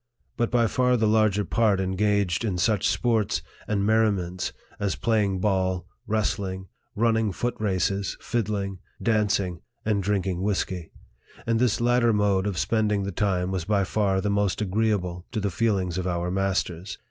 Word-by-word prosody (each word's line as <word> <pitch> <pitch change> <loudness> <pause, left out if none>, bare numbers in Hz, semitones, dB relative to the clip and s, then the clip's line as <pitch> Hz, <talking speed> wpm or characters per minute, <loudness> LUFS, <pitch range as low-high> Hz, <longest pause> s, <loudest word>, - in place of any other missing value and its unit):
But 120 - 0
by 120 -2 +3
far 125 +2 +2
the 110 - +2
larger 105 -2 +3
part 100 +4 +2
engaged 95 0 +1
in 100 -5 -1
such 100 +3 +2
sports 115 -4 +1 0.2
and 100 -2 0
merri 110 0 +4
ments 90 -1 -3 0.3
as 100 -2 0
playing 105 -4 +1
ball, 95 -3 0 0.2
wrestling, 95 -3 -1 0.3
running 110 -1 +2
foot 120 +6 -2
races, 100 -1 0
fiddling, 100 -4 -2 0.2
dancing, 105 -6 +1 0.2
and 105 -2 +1
drinking 95 -2 -1
whisky; 95 -4 -2 0.5
and 115 -1 +1
this 125 -4 +2
lat 120 +1 +3
ter 120 -1 +4
mode 100 -2 +2
of 100 -4 -2
spending 105 +4 +1
the 100 - -3
time 95 -1 0
was 90 -3 -2
by 100 -1 +2
far 95 -1 +1
the 105 - 0
most 100 -2 +1
agreeable 95 -4 -1
to 110 - 0
the 100 -1 -1
feelings 95 -3 0
of 90 - -2
our 90 0 -1
masters. 95 -1 -1
100 Hz, 160 wpm, -25 LUFS, 95-110 Hz, 0.5 s, merri